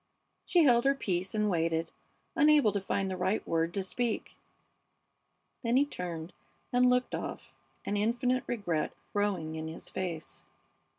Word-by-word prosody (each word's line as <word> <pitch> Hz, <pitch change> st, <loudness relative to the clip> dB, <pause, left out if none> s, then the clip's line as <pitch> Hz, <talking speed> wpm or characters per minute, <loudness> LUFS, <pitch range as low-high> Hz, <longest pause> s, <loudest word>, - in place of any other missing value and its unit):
She 350 Hz, -3 st, +5 dB
held 240 Hz, -4 st, +5 dB
her 275 Hz, 0 st, +4 dB
peace 190 Hz, -5 st, -2 dB
and 210 Hz, 0 st, +2 dB
waited, 165 Hz, -3 st, 0 dB, 0.4 s
unable 295 Hz, -6 st, +5 dB
to 200 Hz, 0 st, -1 dB
find 195 Hz, 0 st, -1 dB
the 190 Hz, -, -2 dB
right 190 Hz, +4 st, -1 dB
word 165 Hz, 0 st, +1 dB
to 195 Hz, -, 0 dB
speak. 230 Hz, +4 st, -2 dB, 1.3 s
Then 235 Hz, 0 st, +1 dB
he 280 Hz, -, +5 dB
turned 175 Hz, -, -6 dB, 0.4 s
and 250 Hz, 0 st, +5 dB
looked 250 Hz, 0 st, +1 dB
off, -, -, -5 dB, 0.3 s
an 205 Hz, -, -1 dB
infinite 245 Hz, +4 st, +1 dB
regret 175 Hz, -9 st, -1 dB, 0.2 s
growing 195 Hz, -6 st, 0 dB
in 160 Hz, 0 st, -4 dB
his 160 Hz, -, -7 dB
face. 170 Hz, -4 st, -5 dB
200 Hz, 150 wpm, -31 LUFS, 170-245 Hz, 1.3 s, She